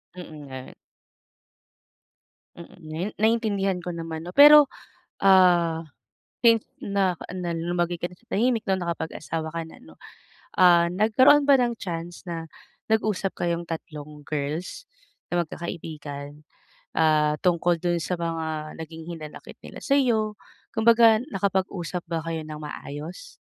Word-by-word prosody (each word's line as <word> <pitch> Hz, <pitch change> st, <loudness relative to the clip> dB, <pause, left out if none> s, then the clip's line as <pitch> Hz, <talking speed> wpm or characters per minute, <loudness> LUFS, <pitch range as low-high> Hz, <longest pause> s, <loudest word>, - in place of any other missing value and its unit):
Mm, 155 Hz, -5 st, -10 dB
nga. 130 Hz, -1 st, -9 dB, 1.8 s
Mm, 170 Hz, -, -11 dB, 0.2 s
ngayon 165 Hz, +7 st, -4 dB
naintindihan 210 Hz, -4 st, +1 dB
ko 180 Hz, -, -4 dB
naman 165 Hz, -1 st, -6 dB
'no, 175 Hz, -, -7 dB
pero, 295 Hz, +3 st, +8 dB, 0.5 s
ah, 175 Hz, -4 st, +5 dB, 0.6 s
since 230 Hz, -2 st, +6 dB, 0.2 s
na 195 Hz, -3 st, 0 dB, 0.2 s
na 180 Hz, -2 st, -3 dB
lumagay 175 Hz, +1 st, -1 dB
ka 175 Hz, -, -2 dB
na 180 Hz, -, -12 dB
sa 235 Hz, -, -31 dB
tahimik 230 Hz, +1 st, +1 dB
'no, 190 Hz, -1 st, +2 dB
na 180 Hz, -, -4 dB
nakapag-asawa 160 Hz, -1 st, -4 dB
ka 165 Hz, +1 st, -4 dB
na 160 Hz, -, -14 dB
'no. 80 Hz, 0 st, -16 dB, 0.6 s
Ah, 175 Hz, -2 st, +6 dB
nagkaroon 225 Hz, +9 st, +5 dB
ba 275 Hz, -1 st, +7 dB
ng 240 Hz, -1 st, +1 dB
chance 170 Hz, -1 st, -6 dB
na 165 Hz, -1 st, -5 dB, 0.4 s
nag-usap 215 Hz, -3 st, 0 dB
kayong 170 Hz, 0 st, -1 dB
tatlong 150 Hz, -2 st, -7 dB
girls 150 Hz, +4 st, -4 dB, 0.5 s
na 175 Hz, 0 st, +2 dB
magkakaibigan, 150 Hz, -3 st, -7 dB, 0.5 s
ah, 155 Hz, -1 st, +3 dB
tungkol 175 Hz, -1 st, +2 dB
dun 175 Hz, 0 st, 0 dB
sa 180 Hz, -, -2 dB
mga 160 Hz, -2 st, -3 dB
naging 160 Hz, 0 st, -8 dB
hinanakit 155 Hz, -2 st, -10 dB
nila -, -, -10 dB
sa'yo, 235 Hz, -7 st, +2 dB, 0.4 s
kumbaga 225 Hz, 0 st, +5 dB
nakapag-usap 190 Hz, -, -2 dB
ba 165 Hz, -1 st, -1 dB
kayo 165 Hz, -1 st, -3 dB
ng 155 Hz, -1 st, -7 dB
maayos? 150 Hz, -, -8 dB
175 Hz, 130 wpm, -25 LUFS, 160-200 Hz, 1.8 s, pero